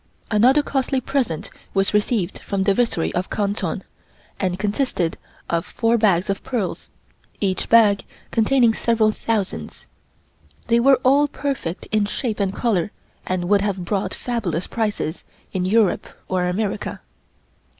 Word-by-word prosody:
Another 255 +7 +5
costly 270 -1 0
present 245 - -2 0.2
was 195 +1 +2
received 210 -3 0
from 195 -1 -2
the 200 0 +3
Viceroy 230 -7 +1
of 180 +1 -2
Canton, 200 -3 -2 0.6
and 185 -2 0
consisted 205 -4 0 0.3
of 170 0 0
four 230 0 +1
bags 200 -5 +3
of 195 -1 -2
pearls, 225 -8 -3 0.5
each 190 -2 -1
bag 215 -3 +5 0.3
containing 235 0 +4
several 220 -1 +2
thousands. 215 -3 -3 0.8
They 235 0 +5
were 265 +1 +5
all 280 +3 +5
perfect 270 - -4
in 215 -1 +2
shape 220 0 -3
and 195 -2 +1
color, 205 -4 0 0.4
and 180 -1 -1
would 200 +1 +4
have 195 -3 -2
brought 195 +2 -1
fabulous 200 -9 -2
prices 210 -8 -2 0.3
in 180 -1 0
Europe 210 +1 +2 0.2
or 180 -1 0
America. 200 +3 -2
210 Hz, 135 wpm, -22 LUFS, 185-235 Hz, 0.8 s, Another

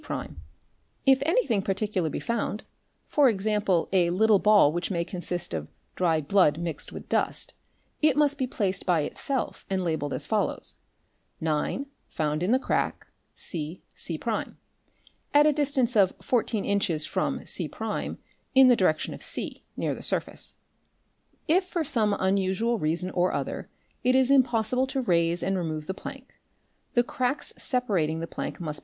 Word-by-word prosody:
i - - -3 0.8
If 270 -1 +5
anything 325 - +2
particular 195 -3 -1
be - - -3
found, 230 -2 -2 0.4
for 285 -3 +4
example 205 -4 +1
a 175 -2 +4
little 205 +3 +4
ball 205 -8 +5
which 175 0 -2
may 170 -3 -1
consist 175 - -3
of 80 -2 -3 0.3
dried 160 -5 +1
blood 180 -6 +4
mixed 165 -3 -4
with - - -9
dust, - - +1 0.5
it 300 -3 +4
must 290 -1 +3
be 260 - 0
placed 195 -6 -1
by 175 -3 +3
itself 265 - -2
and 190 -1 0
labelled 160 -4 -1
as - - -4
follows: - - -1 0.6
9 160 - -1 0.2
found 150 0 -1
in 185 +5 +1
the 255 - +5
crack 265 - -1 0.3
cc', 160 +1 -4 0.8
at 295 +1 +7
a 305 - +5
distance 270 -4 +1
of 195 -3 +4
14 225 -3 0
inches 180 -6 +1
from - - -2
c' - - -1 0.9
in 265 -1 +8
the 245 - +7
direction 170 -7 +1
of - - -10
c, - - -5
near - - -1
the - - -8
surface., - - -1 0.9
If 360 +5 +4
for 350 -2 -2
some 225 -8 +2
unusual 195 +4 +1
reason 170 +4 -1
or 180 0 +1
other, - - -3 0.3
it 255 +1 +3
is 260 0 +4
impossible 250 -1 +3
to 265 0 -1
raise 170 -5 +2
and 195 - 0
remove 160 -4 -3
the 190 - -3
plank, 270 +6 -9 0.6
the 240 - +5
cracks 255 +4 -2
separating 190 - 0
the 165 - -3
plank - - -5
must. 155 -4 -4
200 Hz, 155 wpm, -27 LUFS, 170-255 Hz, 0.9 s, in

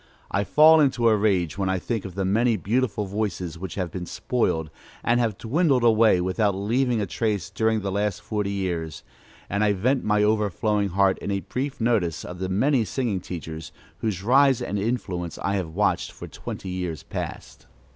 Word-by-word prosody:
I 100 - +1
fall 155 +8 +6
into 130 -5 +3
a 110 - +4
rage 100 -5 +1
when 95 -1 0
I 95 - +1
think 110 +3 -3
of 95 -2 -7
the 95 -1 -1
many 110 +4 +2
beautiful 105 +1 0
voices 95 -4 -3
which 95 -1 -6
have 90 -4 -3
been 90 0 -5
spoiled, 80 -11 -1 0.3
and 120 +1 +2
have 110 -5 0
dwindled 135 +1 +1
away 110 -4 +5
without 95 +3 +1
leaving 120 +4 +1
a 105 - 0
trace 105 0 -2
during 110 -1 +1
the 100 0 -3
last 100 -1 -1
forty 105 -2 -2
years; 85 -5 -3 0.4
and 100 +2 0
I 105 -1 +3
vent 125 +8 +1
my 105 0 +2
overflowing 105 -1 +1
heart 95 +1 +2
in - - -5
a 100 -1 -1
brief 135 +6 -4
notice 110 -8 0
of 90 0 -8
the 95 0 -2
many 125 +6 +2
singing 110 -3 -2
teachers, 80 -3 -7 0.3
whose 100 -4 -2
rise 135 +2 +5
and 100 - -3
influence 95 -6 -3
I 95 - -1
have 90 -4 -3
watched - - +1
for - - -9
twenty 95 - -7
years 90 -4 -4
past. - - -7
100 Hz, 185 wpm, -24 LUFS, 95-115 Hz, 0.4 s, fall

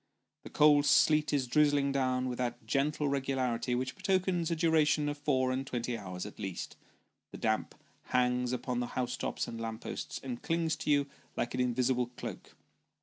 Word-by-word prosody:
The - - -10
cold 150 -1 +5
sleet 155 -1 +4
is 140 -3 +1
drizzling 145 +1 +3
down 130 -1 0
with 125 -1 -4
that 120 -2 -3
gentle 145 +4 0
regularity, 130 -3 0
which 130 +1 -2
betokens 185 -3 +1
a 170 - 0
duration 155 -2 +3
of 145 0 -2
four 130 -3 +1
and 130 +1 -1
twenty 120 -2 -3
hours 90 -4 -6
at 105 - -10
least; 95 -2 -5 0.5
the - - -9
damp 110 -1 -1 0.3
hangs 125 0 +1
upon 125 0 -2
tho 120 - -1
house 125 -1 -2
tops - - -3
and 115 -1 -6
lamp 115 -1 -4
posts, - - -5
and 125 -3 -5
clings 165 -1 0
to 155 - -4
you 145 -1 +4 0.3
like 120 - -1
an 130 - -2
invisible 125 0 +1
cloak. - - -7
130 Hz, 180 wpm, -31 LUFS, 125-150 Hz, 0.5 s, cold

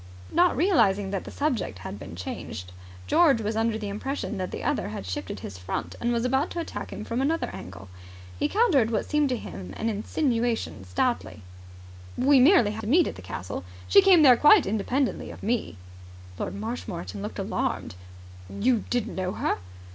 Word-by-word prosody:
Not 350 +2 +3
realizing 205 - +3
that 195 - -3
the - - -7
subject 275 - -2
had 100 +2 -7
been 85 - -9
changed, 90 0 -6 0.3
George 280 - +4
was 215 0 -2
under 225 0 +1
the 215 -2 -5
impression 210 0 -4
that 185 - -2
the - - -6
other - - -1
had 105 -2 -6
shifted 95 +1 -5
his 95 -2 -8
front 90 +1 -4
and 240 - +1
was 235 0 0
about 265 +3 +1
to 345 - -4
attack 335 - -5
him - - -6
from 235 +2 -2
another 320 +4 0
angle. 95 +1 -9 0.5
He - - +2
countered 340 - +3
what 225 - -1
seemed 300 -2 +1
to 250 - 0
him 90 - -8
an 225 - -1
insinuation 230 - -1
stoutly. 105 - -1 0.7
"We 270 +2 +5
merely 260 - +6
happened 215 +1 -4
to 315 - +6
meet 350 - +4
at - - -8
the - - -10
castle. 90 0 -6 0.2
She 395 - +7
came 375 -5 +6
there 255 -4 +8
quite 315 - +7
independently 240 +6 -1
of - - -10
me." 225 - -1 0.6
Lord - - -3
Marshmoreton 200 - -5
looked - - -6
alarmed. - - -2 0.6
"You 225 - +1
didn't 240 -2 -1
know 185 0 -2
her?" - - -1
225 Hz, 185 wpm, -26 LUFS, 170-270 Hz, 0.7 s, there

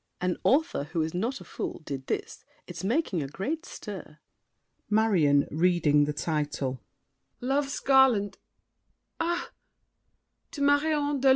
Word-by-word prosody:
An 180 0 0
author 295 - +2
who 160 +1 -1
is 160 - -4
not 230 +10 -2
a - - -10
fool, - - -5
did 135 -2 -5
this. - - -3 0.2
It's - - -8
making 215 - 0
a 140 - -3
great 300 - -4
stir. - - -8 0.7
MARION 185 -10 +3
(reading 155 -3 +3
the 150 - -1
title). 145 -5 -2 0.6
"Love's 275 +2 0
Garland"—ah! 265 - 0 1.0
"To 285 - -5
Marion 290 0 +2
de 270 - +2
Lorme." - - +8
205 Hz, 125 wpm, -28 LUFS, -, 1.0 s, Lorme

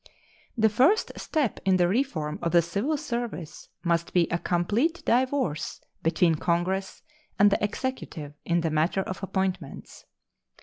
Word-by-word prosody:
The 220 -1 +5
first 265 - +3
step 295 - -1
in 190 -1 +3
the 175 -1 +3
reform 180 - -1
of 170 -1 -1
the 170 -1 +6
civil 205 - -1
service 235 - -5
must 170 -1 0
be 175 -2 +4
a 170 - +1
complete 215 - 0
divorce 255 - 0 0.2
between 165 +1 +3
Congress 185 +3 -1 0.3
and 205 0 +6
the 200 - +1
Executive 205 - -4
in 170 0 +1
the 165 -1 -1
matter 160 +5 +1
of 185 0 -6
appointments. 190 -1 -4
190 Hz, 140 wpm, -27 LUFS, 170-240 Hz, 0.3 s, the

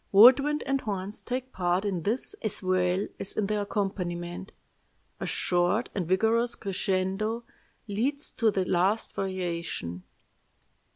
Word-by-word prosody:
Wood 240 +7 +9
wind 295 +2 -1
and 275 0 0
horns 200 -2 -4
take 255 +1 -4
part 180 +2 +1
in 190 -4 -1
this 230 - -1
as 210 -2 0
well 185 +1 +1
as 195 - -3
in 215 - 0
the 210 +1 0
accompaniment. 185 -3 -3 0.7
A - - -3
short 180 +6 +1
and 185 -5 -2
vigorous 225 +6 +2
crescendo 195 +3 -1 0.4
leads 260 +8 0
to 230 -2 +2
the 195 -3 0
last 190 +5 +1
variation. 170 - -3
195 Hz, 130 wpm, -28 LUFS, 185-225 Hz, 0.7 s, Wood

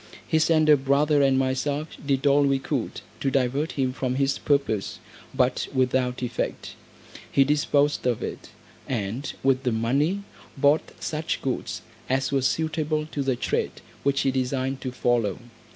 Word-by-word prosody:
His 160 -1 +2
elder 155 -2 +6
brother 140 +2 +3
and 135 -1 +4
myself 140 +3 -1
did 140 -1 0
all 140 0 +5
we 140 -1 +3
could 135 -2 -3 0.2
to 135 - 0
divert 135 +4 0
him 130 -2 0
from 130 -1 -2
his 135 +1 +1
purpose, 140 -9 0 0.3
but 130 -1 +1
without 130 -1 +1
effect. 120 -1 -3 0.6
He 140 - +5
disposed 145 -1 +2
of 120 -3 0
it, - - -6 0.4
and 120 +3 -3
with 135 -1 +3
the 125 -2 0
money 140 - +1 0.3
bought 145 +3 +3
such 155 +1 -2
goods 130 -2 -3 0.3
as 135 +1 +1
were 135 -1 +2
suitable 155 +2 0
to 145 - -2
the 135 -2 +1
trade - - -2 0.2
which 140 0 +1
he 135 - +2
designed 130 +1 -1
to 130 - -3
follow. 120 -6 +1
135 Hz, 150 wpm, -25 LUFS, 130-145 Hz, 0.6 s, elder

